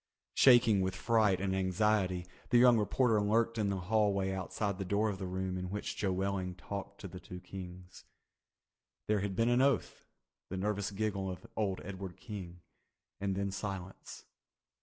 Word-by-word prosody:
Shaking 120 -6 +6
with 95 0 -1
fright 105 -2 +3
and 95 0 0
anxiety, 95 -1 +1 0.2
the 125 - +5
young 120 -1 +7
reporter 110 0 +2
lurked 115 +2 +1
in 105 -2 +1
the 100 - -1
hallway 100 -1 +1
outside 95 +1 -2
the - - -1
door 100 +3 +1
of 95 - -7
the 95 - -4
room 95 0 -2
in 90 0 -4
which 105 +2 -4
Joe 100 -2 0
Welling 95 -1 -1
talked 100 +2 -7
to 100 - -6
the 90 0 -9
two 90 0 -9
Kings. 90 -1 -10 1.0
There 105 -1 +2
had 95 -1 -2
been 115 +4 +2
an 120 +1 +4
oath, 135 -3 +1 0.4
the 95 - -4
nervous 105 +1 -1
giggle 100 -2 -2
of 90 - -7
old 100 -3 -1
Edward 95 -1 -7
King, 90 -6 -8 0.6
and 95 -1 -1
then 100 0 -1
silence. 95 -1 -6
100 Hz, 170 wpm, -33 LUFS, 95-105 Hz, 1.0 s, young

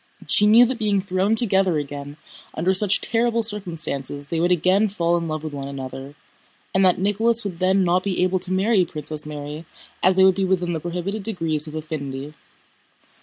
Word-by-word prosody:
She 210 - +4
knew 230 +3 +7
that 245 0 -3
being 205 -2 +1
thrown 190 +3 0
together 195 -7 +3
again 145 0 -6 0.4
under 180 +4 +1
such 195 +1 +3
terrible 230 0 +1
circumstances 165 - -2
they 165 - -2
would 175 +2 +1
again 185 +5 +3
fall 175 -4 0
in 170 -1 -2
love 155 -1 -4
with 155 -2 -6
one 140 -1 -6
another, 135 0 -8 0.6
and 190 - +2
that 185 -2 +4
Nicholas 220 +4 +2
would 185 -5 -6
then 190 +1 +2
not 180 +1 +1
be 185 -2 -1
able 185 0 +1
to 180 +1 -4
marry 195 +1 +2
Princess 155 -2 -5
Mary 150 +1 -7 0.4
as 185 +1 +3
they 190 - +5
would 190 0 +6
be 195 +1 -2
within 180 -2 0
the 160 - -2
prohibited 180 +5 -4
degrees 165 -7 -2
of 155 - -8
affinity. 150 -2 -6
180 Hz, 190 wpm, -22 LUFS, 155-195 Hz, 0.6 s, knew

